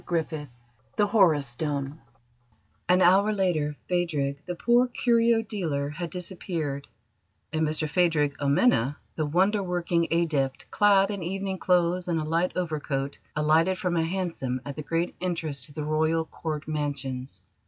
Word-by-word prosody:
CHAPTER 170 -2 0
XIX 150 -3 -6 0.5
THE 210 - +3
HORUS 185 -9 +4
STONE 140 +3 -3 0.9
An 180 +1 +5
hour 195 +4 +5
later 170 -7 0
Phadrig, 150 -6 -1
the 180 - -3
poor 240 +6 +3
curio 235 -2 +2
dealer, 160 -10 -2
had 170 +2 -5
disappeared, 170 -6 -4 0.7
and 160 - 0
Mr 155 0 0
Phadrig 150 -4 +2
Amena, 140 - +3 0.2
the 155 -2 -1
wonder 190 +7 +2
working 175 -2 0
Adept, 150 -6 0
clad 200 -1 +4
in 200 -2 -4
evening 190 +2 -3
clothes 180 0 +2
and 170 -2 0
a - - -2
light 165 +4 0
overcoat, 145 -5 -2 0.2
alighted 160 +5 +3
from 180 -1 -1
a 165 - +2
hansom 165 -8 -2
at 140 -1 -5
the 155 - -5
great 165 +3 -1
entrance 165 -7 -2
to - - -15
the 150 +1 -5
Royal 160 +2 +1
Court 155 -2 -5
Mansions. 140 -4 -4
165 Hz, 150 wpm, -27 LUFS, 150-185 Hz, 0.9 s, An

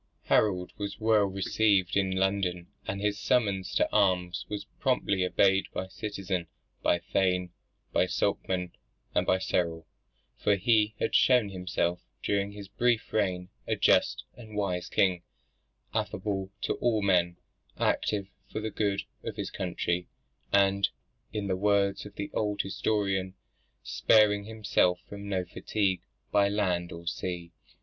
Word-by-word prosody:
Harold 90 -4 +2
was 100 +1 -4
well 110 -2 +4
received 95 0 +2
in 95 -1 +2
London, 95 -2 0 0.2
and 100 - -2
his 105 0 0
summons 100 -7 +1
to - - +3
arms 90 -3 +2
was 105 -1 -4
promptly 125 -9 +1
obeyed 95 +1 +3
by 95 - -2
citizen, 95 -3 -3 0.3
by - - +3
thane, 90 0 0 0.4
by - - +3
sokman, 90 -2 -1 0.4
and - - +1
by 95 - +4
ceorl; 85 -3 -1 0.5
for 105 - +3
he 105 +1 +3
had - - -1
shown 125 -5 +5
himself 90 -2 -1 0.2
during 100 0 0
his 100 -1 -9
brief 115 +3 0
reign 95 -4 0 0.2
a - - +1
just - - +3
and 110 -3 -11
wise 90 -4 -1
king, 90 -3 +2 0.7
affable 95 0 -2
to - - 0
all 110 -4 +1
men, 90 -3 +2 0.4
active 100 -2 +1 0.3
for - - -3
the 110 0 -3
good 100 -2 0 0.2
of - - -5
his - - -4
country, 90 -1 -2 0.4
and 100 0 +4 0.4
(in 105 -2 -3
the 95 -2 0
words 100 0 +1
of 105 - -14
the 100 - -5
old 105 -1 -1
historian) 95 0 -1 0.5
sparing 105 -2 +4
himself 105 -5 +1
from 100 0 -8
no 95 -2 0
fatigue 95 +1 -1 0.3
by 100 -1 +4
land 90 -4 0
or 85 0 -9
sea. 85 0 -4
100 Hz, 140 wpm, -29 LUFS, 90-105 Hz, 0.7 s, shown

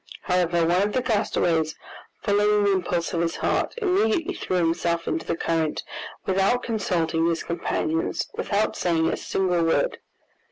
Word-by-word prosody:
However, 175 -2 +1
one 175 +3 +3
of 205 +1 0
the 255 - 0
castaways, 170 -8 +1 0.5
following 210 0 +3
the 200 - +3
impulse 180 -2 -1
of 170 - 0
his 165 -1 -1
heart, - - 0
immediately 365 - +1
threw 185 - -3
himself 170 0 0
into - - -2
the - - -1
current, 160 -3 -1 0.4
without 195 +6 +2
consulting 170 -7 0
his 165 -1 0
companions, 165 -1 -1
without 210 +1 0
saying 165 -2 +1
a - - 0
single 180 -3 0
word. 165 - +1
180 Hz, 150 wpm, -24 LUFS, 165-205 Hz, 0.5 s, one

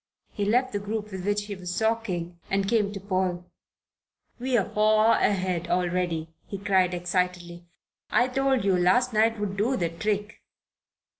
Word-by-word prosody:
He 205 - -2
left 250 +4 +2
the 205 - -1
group 210 +1 -4
with 190 -1 -6
which 205 0 +1
he 205 - -5
was 180 -1 -5
talking, 190 -7 -1
and 195 0 0
came 210 -2 +2
to 200 - -6
Paul. 185 -2 -1 0.9
"We're 245 -5 +1
far 215 +1 +3
ahead 185 -4 0
already," 175 -2 -1
he 200 - -5
cried 190 -2 +2
excitedly. 175 -1 -2 0.4
"I 245 - +3
told 265 -3 +1
you 195 -2 +3
last 190 +8 +3
night 220 +1 +2
would 200 -2 -2
do 240 +6 +1
the 170 -2 0
trick." 210 +4 -3
200 Hz, 155 wpm, -26 LUFS, 180-215 Hz, 0.9 s, far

